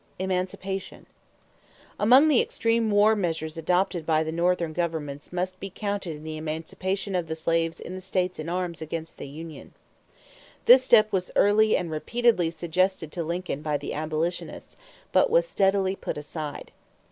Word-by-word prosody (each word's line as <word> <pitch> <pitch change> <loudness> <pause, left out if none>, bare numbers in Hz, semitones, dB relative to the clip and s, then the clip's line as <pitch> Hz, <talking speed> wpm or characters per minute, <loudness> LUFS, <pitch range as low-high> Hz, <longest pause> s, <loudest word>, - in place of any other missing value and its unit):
=Emancipation.= 190 +1 -3 0.9
Among 255 +8 +6
the 290 -5 +5
extreme 230 -1 0
war 210 +1 +5
measures 165 -5 -2
adopted 175 +1 0
by 155 0 +2
the 160 - -3
Northern 170 -1 0
government 155 -4 -3
must 185 +1 -3
be 195 - -6
counted 195 -6 -4
the 155 0 -5
emancipation 165 +5 -3
of 175 -3 -1
the 160 - -3
slaves 165 +1 0
in 180 - -7
the 185 - -6
states 185 -1 -1
in 155 +1 -4
arms 175 -2 -3
against 160 +1 -6
the - - -6
union. 155 +3 -10 0.9
This 250 +1 +9
step 215 -4 +5
was 185 -1 -1
early 215 +1 +4
and 170 -2 -4
repeatedly 220 +2 +1
suggested 170 0 -1
to 170 - -3
Lincoln 170 -2 -3
by 150 -1 -1
the 145 - -6
abolitionists; 155 +3 -3 0.4
but - - +4
was - - +3
steadily 195 - +1
put - - -5
aside. 150 0 -6
180 Hz, 155 wpm, -26 LUFS, 160-195 Hz, 0.9 s, This